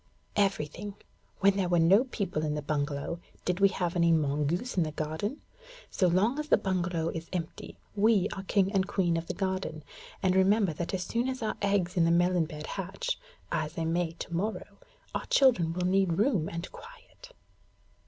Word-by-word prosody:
'Everything. 195 Hz, 0 st, -1 dB, 0.5 s
When 195 Hz, 0 st, +4 dB
there 185 Hz, -3 st, 0 dB
were 175 Hz, -, +3 dB
no 190 Hz, +9 st, +5 dB
people 195 Hz, -10 st, -3 dB
in 150 Hz, -1 st, -1 dB
the 150 Hz, -, -3 dB
bungalow, 145 Hz, +2 st, -2 dB, 0.3 s
did 180 Hz, 0 st, 0 dB
we 195 Hz, 0 st, +6 dB
have 180 Hz, -2 st, -2 dB
any 170 Hz, -1 st, +4 dB
mongoose 155 Hz, -, 0 dB
in 185 Hz, -, +2 dB
the 155 Hz, -2 st, 0 dB
garden? 160 Hz, -, -3 dB, 0.5 s
So 185 Hz, -, +2 dB
long 205 Hz, -, +2 dB
as 300 Hz, -, -3 dB
the -, -, +5 dB
bungalow 180 Hz, -3 st, -1 dB
is 165 Hz, 0 st, -6 dB
empty, 170 Hz, -3 st, -5 dB, 0.2 s
we 205 Hz, -2 st, +4 dB
are 195 Hz, -, -5 dB
king 195 Hz, 0 st, +1 dB
and 195 Hz, -2 st, +1 dB
queen 180 Hz, -4 st, +1 dB
of 165 Hz, 0 st, -3 dB
the -, -, -4 dB
garden; 185 Hz, -5 st, -2 dB, 0.4 s
and 185 Hz, -1 st, +3 dB
remember 195 Hz, -1 st, +4 dB
that 170 Hz, +4 st, -3 dB
as 180 Hz, -, -2 dB
soon 235 Hz, +5 st, -1 dB
as 260 Hz, -2 st, -4 dB
our 215 Hz, -, -1 dB
eggs 200 Hz, -3 st, +1 dB
in 170 Hz, -, +5 dB
the -, -, +3 dB
melon 175 Hz, 0 st, +3 dB
bed 150 Hz, -1 st, -7 dB
hatch 195 Hz, -, -3 dB, 0.3 s
(as 155 Hz, -2 st, -1 dB
they 165 Hz, -1 st, -2 dB
may 165 Hz, 0 st, 0 dB
to 170 Hz, -, -8 dB
morrow), 205 Hz, +6 st, -3 dB, 0.3 s
our -, -, -3 dB
children 230 Hz, -12 st, +4 dB
will 180 Hz, +1 st, -2 dB
need 190 Hz, -1 st, +3 dB
room 200 Hz, -, +1 dB
and 170 Hz, +2 st, -6 dB
quiet.' -, -, -14 dB
180 Hz, 190 wpm, -29 LUFS, 165-200 Hz, 0.5 s, we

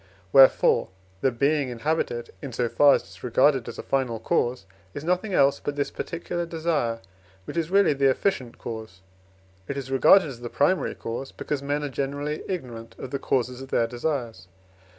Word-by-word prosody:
Wherefore, 135 Hz, -1 st, +6 dB, 0.3 s
the 135 Hz, -, +3 dB
being 140 Hz, +3 st, +1 dB
inhabited, 120 Hz, -2 st, -2 dB
in 135 Hz, -4 st, -7 dB
so 120 Hz, 0 st, 0 dB
far 145 Hz, +4 st, +5 dB
as -, -, -2 dB
it -, -, -18 dB
is -, -, -16 dB
regarded 130 Hz, +1 st, +3 dB
as 115 Hz, -, -8 dB
a -, -, -6 dB
final 130 Hz, -4 st, -1 dB
cause, 120 Hz, -1 st, 0 dB, 0.3 s
is 145 Hz, -, -5 dB
nothing 180 Hz, +4 st, 0 dB
else 140 Hz, 0 st, +4 dB
but 145 Hz, -, -4 dB
this 145 Hz, -1 st, -2 dB
particular 170 Hz, +1 st, -4 dB
desire, 155 Hz, -9 st, -1 dB, 0.4 s
which -, -, -7 dB
is 165 Hz, -1 st, -1 dB
really 195 Hz, -4 st, +4 dB
the 135 Hz, -1 st, +3 dB
efficient 130 Hz, -4 st, -1 dB
cause; 110 Hz, -5 st, -8 dB, 0.7 s
it 140 Hz, -, -4 dB
is 135 Hz, -1 st, -5 dB
regarded 155 Hz, +7 st, +6 dB
as 130 Hz, -5 st, -8 dB
the 120 Hz, 0 st, -6 dB
primary 180 Hz, +10 st, +1 dB
cause, 120 Hz, +4 st, -5 dB
because 145 Hz, -2 st, -4 dB
men 145 Hz, +1 st, -2 dB
are 145 Hz, -, -2 dB
generally 145 Hz, +3 st, -3 dB
ignorant 115 Hz, -10 st, -6 dB
of 130 Hz, -, -8 dB
the 140 Hz, -, -2 dB
causes 125 Hz, -1 st, -1 dB
of 135 Hz, -, -9 dB
their 115 Hz, -, +2 dB
desires. 120 Hz, -3 st, -3 dB
135 Hz, 185 wpm, -25 LUFS, 120-150 Hz, 0.7 s, Wherefore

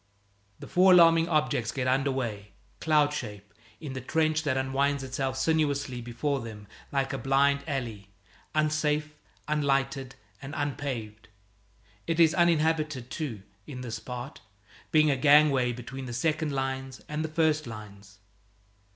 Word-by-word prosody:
The -, -, -10 dB
four 185 Hz, 0 st, +5 dB
alarming 165 Hz, -1 st, +6 dB
objects 150 Hz, -8 st, +1 dB
get 130 Hz, -2 st, -2 dB
under 135 Hz, +2 st, +2 dB
way, 105 Hz, -6 st, -4 dB, 0.3 s
cloud 150 Hz, -2 st, +3 dB
shape, 105 Hz, -7 st, -7 dB, 0.3 s
in 145 Hz, -4 st, -6 dB
the 130 Hz, -, -5 dB
trench 155 Hz, +3 st, +1 dB
that 140 Hz, -4 st, 0 dB
unwinds 135 Hz, +1 st, 0 dB
itself 130 Hz, 0 st, -3 dB
sinuously 140 Hz, -4 st, 0 dB
before 135 Hz, +4 st, -2 dB
them 110 Hz, -3 st, -9 dB, 0.3 s
like 135 Hz, -1 st, -1 dB
a 135 Hz, -, -3 dB
blind 140 Hz, +2 st, +2 dB
alley, 115 Hz, -9 st, -4 dB, 0.5 s
unsafe, 150 Hz, 0 st, +1 dB, 0.3 s
unlighted, 135 Hz, -3 st, 0 dB, 0.3 s
and 140 Hz, +2 st, -7 dB
unpaved. 130 Hz, -7 st, -4 dB, 0.8 s
It 165 Hz, 0 st, -1 dB
is 165 Hz, -1 st, +6 dB
uninhabited, 155 Hz, -6 st, +1 dB
too, 125 Hz, -, -4 dB, 0.2 s
in 125 Hz, -3 st, -7 dB
this 120 Hz, -3 st, -5 dB
part, 125 Hz, +2 st, -7 dB, 0.5 s
being 155 Hz, -1 st, +5 dB
a -, -, +2 dB
gangway 140 Hz, -2 st, +5 dB
between 125 Hz, +2 st, -7 dB
the 120 Hz, -, -6 dB
second 155 Hz, +4 st, 0 dB
lines 135 Hz, -1 st, -3 dB
and 150 Hz, +1 st, -3 dB
the 160 Hz, -, -3 dB
first 155 Hz, -2 st, +1 dB
lines. 100 Hz, -3 st, -11 dB
140 Hz, 140 wpm, -28 LUFS, 125-155 Hz, 0.8 s, alarming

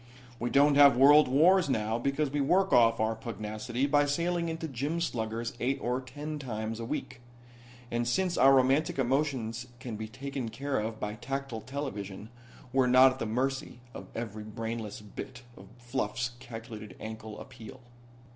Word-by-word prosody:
We 120 Hz, -, -1 dB
don't 145 Hz, +2 st, +5 dB
have 140 Hz, -3 st, +8 dB
world 145 Hz, +3 st, +7 dB
wars 165 Hz, +5 st, +4 dB
now 110 Hz, -2 st, 0 dB
because 140 Hz, +3 st, 0 dB
we 145 Hz, 0 st, 0 dB
work 190 Hz, +7 st, +2 dB
off 115 Hz, -1 st, +5 dB
our 110 Hz, +1 st, +1 dB
pugnacity 110 Hz, +3 st, -3 dB
by 145 Hz, 0 st, +3 dB
sailing 170 Hz, +3 st, 0 dB
into 160 Hz, 0 st, -4 dB
gym 145 Hz, +5 st, -2 dB
sluggers 115 Hz, -6 st, -2 dB
eight 135 Hz, +3 st, 0 dB
or 125 Hz, +1 st, -1 dB
ten 145 Hz, +4 st, -6 dB
times 110 Hz, -4 st, -4 dB
a 115 Hz, -, -4 dB
week. 120 Hz, +1 st, -5 dB, 0.7 s
And 120 Hz, 0 st, -1 dB
since 180 Hz, +8 st, +1 dB
our 135 Hz, -, +6 dB
romantic 135 Hz, +4 st, +2 dB
emotions 130 Hz, -3 st, -1 dB
can 115 Hz, -3 st, -6 dB
be 110 Hz, 0 st, -5 dB
taken 135 Hz, +1 st, -5 dB
care 140 Hz, +4 st, -2 dB
of 110 Hz, +1 st, -4 dB
by 105 Hz, 0 st, -3 dB
tactile 135 Hz, 0 st, -5 dB
television 110 Hz, -7 st, -6 dB, 0.4 s
we're 130 Hz, -1 st, +4 dB
not 130 Hz, +1 st, +7 dB
at 130 Hz, -, -8 dB
the 115 Hz, -, -2 dB
mercy 130 Hz, +3 st, -2 dB
of -, -, -9 dB
every 110 Hz, -2 st, -5 dB
brainless 110 Hz, 0 st, -5 dB
bit 125 Hz, +4 st, -9 dB
of -, -, -13 dB
fluff's 120 Hz, 0 st, -2 dB
calculated 115 Hz, -3 st, -9 dB
ankle 110 Hz, -1 st, -7 dB
appeal." 115 Hz, +3 st, -11 dB
125 Hz, 165 wpm, -30 LUFS, 115-140 Hz, 0.7 s, have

